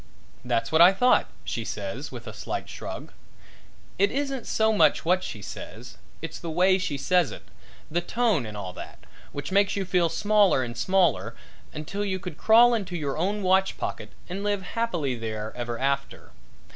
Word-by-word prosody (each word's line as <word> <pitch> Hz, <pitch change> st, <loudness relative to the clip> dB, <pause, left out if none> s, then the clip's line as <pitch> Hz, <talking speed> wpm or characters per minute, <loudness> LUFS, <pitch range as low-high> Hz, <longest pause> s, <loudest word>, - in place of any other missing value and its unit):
"That's 115 Hz, 0 st, -1 dB
what 160 Hz, +1 st, +5 dB
I 180 Hz, +3 st, +9 dB
thought," 250 Hz, +6 st, +4 dB, 0.2 s
she -, -, -3 dB
says -, -, -5 dB
with -, -, -8 dB
a -, -, -7 dB
slight -, -, -4 dB
shrug. -, -, -7 dB, 0.9 s
It 405 Hz, -, +4 dB
isn't 275 Hz, -3 st, -2 dB
so 220 Hz, 0 st, +2 dB
much 205 Hz, -, +3 dB
what 185 Hz, +2 st, +2 dB
she 105 Hz, -, -6 dB
says -, -, -9 dB, 0.3 s
it's -, -, -5 dB
the 170 Hz, -, -6 dB
way 185 Hz, +4 st, +3 dB
she 155 Hz, -6 st, -2 dB
says 180 Hz, +2 st, +2 dB
it, -, -, -9 dB, 0.5 s
the 175 Hz, +2 st, +1 dB
tone 210 Hz, -, +1 dB
and 105 Hz, -1 st, -7 dB
all 95 Hz, -3 st, -6 dB
that, -, -, -10 dB, 0.3 s
which 145 Hz, +4 st, -5 dB
makes 195 Hz, 0 st, +3 dB
you 195 Hz, -1 st, -1 dB
feel 180 Hz, -2 st, +2 dB
smaller 205 Hz, -8 st, +3 dB
and 120 Hz, -1 st, -6 dB
smaller 185 Hz, +5 st, +1 dB, 0.4 s
until 155 Hz, +7 st, -4 dB
you 190 Hz, -2 st, -1 dB
could 180 Hz, -4 st, -8 dB
crawl 235 Hz, +2 st, +6 dB
into 190 Hz, -6 st, -2 dB
your 145 Hz, -4 st, -2 dB
own 200 Hz, +5 st, -1 dB
watch 190 Hz, +1 st, +2 dB
pocket -, -, -4 dB, 0.2 s
and 190 Hz, +3 st, -5 dB
live 205 Hz, -2 st, 0 dB
happily 175 Hz, -, -1 dB
there 110 Hz, -2 st, -5 dB
ever 120 Hz, -1 st, -4 dB
after. 140 Hz, +1 st, -2 dB
180 Hz, 180 wpm, -26 LUFS, 140-205 Hz, 0.9 s, I